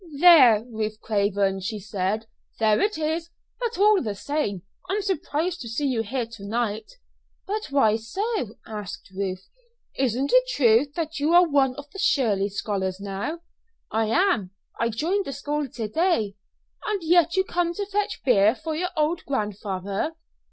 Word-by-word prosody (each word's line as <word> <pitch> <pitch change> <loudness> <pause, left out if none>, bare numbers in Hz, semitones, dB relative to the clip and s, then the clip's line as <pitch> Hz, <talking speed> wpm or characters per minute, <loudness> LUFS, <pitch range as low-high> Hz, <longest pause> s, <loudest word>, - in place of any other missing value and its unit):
"There, 260 -11 +8
Ruth 215 -2 -4
Craven," 200 -2 0
she 215 +4 -4
said 205 +1 -2 0.3
"there 215 -1 +3
it 420 -2 +1
is. 320 +2 -2 0.3
But, 475 -2 -2
all 415 0 +5
the 210 -5 -3
same, 205 - -2 0.3
I'm 405 +2 0
surprised 350 -2 -1
to 230 - -6
see 255 +6 -2
you 255 -5 +1
here 240 +3 -2
to 225 -3 -12
night." 220 - -2 0.5
"But 425 +2 -3
why 225 -6 +3
so?" 250 - -3
asked 210 -3 -7
Ruth. 190 -1 -3 0.5
"Isn't 260 +1 0
it - - +5
true 245 - +4
that 320 -2 -3
you 300 +4 +2
are 355 0 +7
one 275 -4 +2
of 285 +1 -9
the 390 - -9
Shirley 210 - +2
scholars 195 -2 -2
now?" 200 +12 -4 0.5
"I 220 0 +1
am; 285 - +2 0.3
I 230 - +1
joined 345 - 0
the 275 - -4
school 290 +1 -3
to 230 -2 -4
day." 270 - +1 0.5
"And 415 -4 -2
yet 340 +1 +4
you 380 - +3
come 345 -2 -1
to 405 - -2
fetch 415 +1 -2
beer 220 -3 +5
for 320 +2 -5
your 360 +3 -1
old 310 +2 +1
grandfather!" 205 - -3
255 Hz, 165 wpm, -25 LUFS, 210-340 Hz, 0.5 s, There